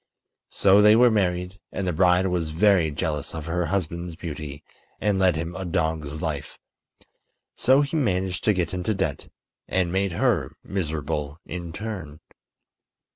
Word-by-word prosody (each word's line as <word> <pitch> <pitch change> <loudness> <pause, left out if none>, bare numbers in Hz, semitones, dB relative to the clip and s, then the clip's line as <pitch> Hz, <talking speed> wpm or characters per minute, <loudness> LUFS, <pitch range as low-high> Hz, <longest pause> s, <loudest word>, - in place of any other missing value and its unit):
So 100 +1 +5
they 105 +1 +7
were 120 +1 +6
married, 90 -2 0
and 95 - -3
the 90 - 0
bride 90 +2 +4
was 90 -4 -1
very 90 0 +3
jealous 75 0 -3
of 80 -2 -5
her 85 0 -1
husband's 85 -1 -2
beauty 75 -3 -7 0.4
and 100 -1 +1
led 95 -3 +4
him 85 +2 -4
a 95 - -4
dog's 80 -3 -2
life. 75 -4 -4 1.0
So 130 +3 +4
he 140 +3 -3
managed 95 - 0
to 105 - +5
get 90 -3 -1
into 90 +4 -1
debt 90 -7 -2 0.4
and 90 -2 0
made 95 0 0
her 95 - +1
miserable 75 -4 -3
in 85 -1 -6
turn. 90 -6 -6
90 Hz, 150 wpm, -25 LUFS, 80-95 Hz, 1.0 s, they